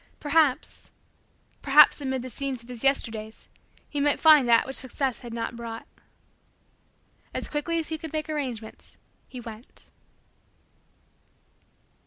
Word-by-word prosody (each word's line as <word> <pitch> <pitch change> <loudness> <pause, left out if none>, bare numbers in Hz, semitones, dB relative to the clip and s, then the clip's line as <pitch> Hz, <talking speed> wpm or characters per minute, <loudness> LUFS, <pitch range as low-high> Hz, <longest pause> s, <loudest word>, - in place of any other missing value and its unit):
Perhaps 295 -2 +1 0.7
perhaps 295 +1 +6
amid 265 -2 -2
the 255 - -6
scenes 265 0 -4
of 235 - -18
his 245 -1 -4
Yesterdays, 225 -5 0 0.4
he 290 - -4
might 290 0 +2
find 305 -6 +6
that 230 -1 +5
which 265 - -5
Success 260 0 -2
had 240 -2 -9
not 230 +1 -4
brought. 230 -1 -7 1.5
As - - -2
quickly 320 +3 -2
as 325 -1 -3
he 315 -1 -4
could 320 -1 -7
make 310 0 -3
arrangements, 255 -8 -6 0.3
he 255 - -9
went. 230 0 -11
265 Hz, 130 wpm, -26 LUFS, 235-295 Hz, 1.5 s, perhaps